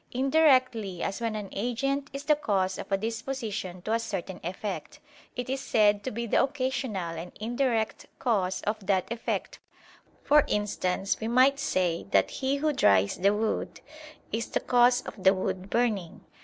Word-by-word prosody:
Indirectly 255 - +2
as 200 +4 -3
when 225 -2 -1
an 205 -2 -5
agent 275 +6 -1
is 275 +1 -6
the 300 +1 +4
cause 195 -10 0
of - - -8
a 195 - +3
disposition 220 -4 -4
to 220 - -1
a 230 - +2
certain 195 -5 -5
effect, 190 +4 -5 0.4
it 245 - -4
is 265 +1 -2
said 205 -2 +3
to - - -2
be 235 0 -4
the 230 - +3
occasional 255 - -2
and 175 +2 -8
indirect 230 0 -1
cause 190 -6 0
of 215 0 -2
that 190 +1 +1
effect: 235 0 -3 0.6
for 295 0 +5
instance, 195 -2 -1
we 220 - -3
might 260 +4 +4
say 180 -10 0
that - - +3
he 270 +1 -1
who 300 +2 0
dries 100 - +3
the 195 +2 +3
wood 215 +1 -2 0.5
is 225 +2 -2
the - - -1
cause 245 0 +4
of 195 - -9
the 190 +1 +6
wood 190 0 -3
burning. 215 -8 -1
220 Hz, 170 wpm, -28 LUFS, 195-255 Hz, 0.6 s, the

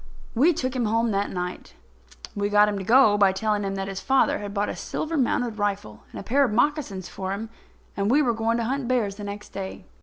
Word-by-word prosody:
We 280 +9 +4
took 260 -5 -3
him 245 -2 0
home 225 +1 +1
that 200 0 0
night. 180 0 -5 0.6
We 205 0 -1
got 210 0 +5
him 205 -1 -2
to - - -5
go 220 -1 +5
by 200 -2 +5
telling 210 +2 -1
him 195 0 -2
that 195 0 -3
his 195 -1 -5
father 265 0 +2
had 205 -1 -6
bought 205 0 -1
a - - -4
silver 325 +1 -4
mounted 245 -5 0
rifle 195 - -2
and - - -7
a - - -7
pair 275 +7 +3
of 255 - +1
moccasins 240 - 0
for 190 0 -5
him, 220 +3 -6 0.4
and 200 +1 0
we 290 +5 +4
were 240 -3 +2
going 225 +1 0
to 235 - -1
hunt 260 +2 -2
bears 230 -6 0
the 210 - -7
next 205 0 -7
day. 190 -1 -7
210 Hz, 240 wpm, -25 LUFS, 200-245 Hz, 0.6 s, got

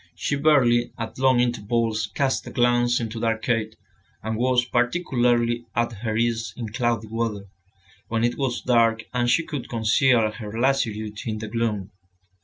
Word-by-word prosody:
She - - -1
barely, 130 -5 +3
at 115 +2 -6
long 130 -2 +4
intervals, 115 -2 0
cast 135 -2 0
a - - -5
glance 120 0 +2
into 115 -1 -4
the 115 - 0
arcade, 115 -1 -1 0.5
and 110 0 -2
was 125 +1 +2
particularly 120 -3 +1
at 120 0 +1
her 110 -2 -2
ease 115 -1 -1
in 115 -3 -5
cloudy 120 -2 0
weather, 110 -2 -3 0.6
when 115 0 -1
it 120 0 +1
was 130 -3 -2
dark 115 -2 +3
and 120 -1 +1
she 165 +7 +2
could 145 -5 -6
conceal 115 0 +3
her 110 0 -7
lassitude 110 -5 0
in 110 -1 -2
the 110 +1 -6
gloom. 105 -3 -2
120 Hz, 160 wpm, -24 LUFS, 110-125 Hz, 0.6 s, long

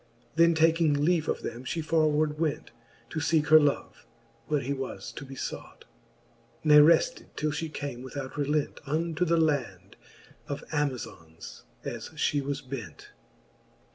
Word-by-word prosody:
Then 170 0 +5
taking 160 -1 +3
leave 170 -2 +2
of - - -2
them, 120 +2 -5
flie 160 +5 -3
forward 155 -1 +1
went. 160 -3 -2 0.4
To 160 - -2
feeke 155 0 +1
her 155 0 +9
love, 145 -2 -1 0.4
where 150 -1 +1
he 135 +3 -2
was 135 -1 -6
to - - -8
be 135 0 -10
fought; - - -7 0.8
Ne 150 -1 +7
refled 160 +2 +4
till 155 0 -1
fhe 155 +1 -4
came 140 -5 -5
without 130 +1 -7
relent 150 0 -1
Unto 165 +4 0
the 170 0 +2
land 125 - -1 0.5
of 145 +1 -5
Amazons, 125 - -4 0.2
as - - -5
fhe 145 - 0
was 140 +1 -3
bent. 125 - -8
150 Hz, 145 wpm, -28 LUFS, 135-160 Hz, 0.8 s, her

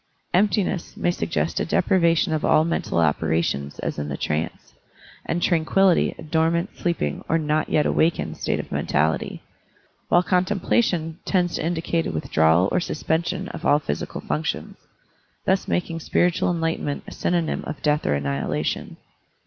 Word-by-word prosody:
Emptiness" 195 -1 +1
may 175 - +1
suggest 80 - -1
a - - 0
deprivation 170 -3 +2
of 155 - -1
all 155 - +4
mental 165 - -1
operations 80 -2 0
as - - -3
in 75 0 -3
the 70 - -3
trance, 80 +1 -3 0.5
and 175 +1 -1
"tranquillity" 175 +2 +3
a - - -9
dormant, 165 +4 0
sleeping, 170 - -2
or 165 - +3
"not 155 -1 0
yet 150 - +2
awakened" 165 +1 +1
state - - -1
of - - -7
men - - -2
tality, 80 +1 0 0.7
while 175 - +5
"contemplation" 180 -3 +1
tends 180 -3 +1
to - - -2
indicate 165 0 -1
a - - -2
withdrawal 80 +3 +3
or - - +2
suspension 170 +3 -2
of - - -8
all 145 - +4
psychical 75 - -4
functions; 75 +2 -3 0.7
thus 190 +1 +1
making 170 -2 -1
spiritual 175 +2 +1
enlightenment 165 -4 -1
a - - -10
synonym 170 -2 -1
of 155 - -5
death 150 0 +2
or 75 - +2
annihilation. 70 -1 -2
160 Hz, 150 wpm, -23 LUFS, -, 0.7 s, while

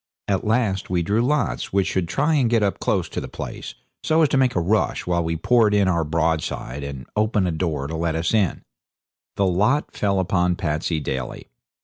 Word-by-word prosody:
At 95 -2 0
last 110 -4 0
we 90 -2 +1
drew 105 +6 +1
lots 150 +5 0
which 100 -1 +2
should 90 -3 -1
try 145 - +1
and 135 -6 +3
get 115 -2 +2
up 100 - 0
close - - 0
to - - -4
the - - -6
place, - - -7 0.3
so 160 +1 +3
as 150 - +3
to 135 - +2
make 130 -2 +2
a - - +3
rush 100 +6 0
while 85 -1 +1
we 80 0 -2
poured 110 +4 +3
in 100 -2 +3
our 85 -3 +2
broadside 80 -3 -2
and 70 -2 -6
open 105 -2 +1
a 90 - 0
door 80 -4 -2
to 80 +3 -4
let 80 0 -1
us 80 +3 -1
in. 105 -6 +1 0.7
The 100 - +1
lot 105 +11 +1
fell 100 -2 0
upon 90 -1 +1
Patsey 80 -1 -1
Daly. 65 -4 -5
95 Hz, 210 wpm, -22 LUFS, 80-110 Hz, 0.7 s, and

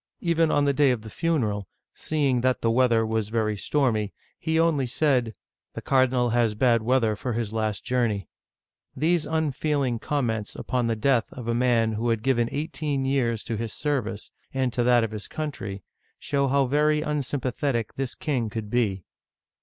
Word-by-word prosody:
Even 165 -2 +2
on 145 -1 +2
the 140 - +3
day 145 0 +4
of 120 -4 0
the 110 - -9
funeral, 110 - -1 0.3
seeing 140 -5 0
that 130 0 +1
the 115 - +2
weather 115 -2 +3
was 110 -1 -1
very 110 -1 0
stormy, 110 -3 0 0.2
he 160 0 0
only 155 -6 +2
said, 125 -3 +1 0.2
" - - -64
The - - -5
cardinal 130 -2 +2
has 115 -2 +2
bad 115 0 +3
weather 115 -2 +2
for 125 +3 -3
his 110 -2 -3
last 110 -2 -1
journey! 115 -7 0 0.3
" - - -68 0.3
These 165 +1 +1
unfeeling 145 -5 0
comments 115 -7 -2
upon 125 -2 -1
the 115 - 0
death 120 +1 +1
of 125 -3 -8
a 115 - +1
man 120 -2 +2
who 110 +2 -1
had 115 -2 0
given 120 -3 +2
eighteen 145 -2 -2
years 120 -5 0
to 115 - -3
his 115 -1 -4
ser 145 -2 0
vice 105 -1 -7 0.2
and 130 -2 -1
to 120 - 0
that 120 -1 +4
of 110 - -2
his 105 -2 -6
country 100 -11 -5 0.3
show 140 -1 0
how 140 +1 +3
very 150 +3 +2
unsympa 140 -4 -2
thetic 120 -7 -1
this 135 -2 -3
king 125 -7 -1
could 105 -1 -5
be. 105 -7 0
125 Hz, 185 wpm, -25 LUFS, 110-140 Hz, 0.3 s, day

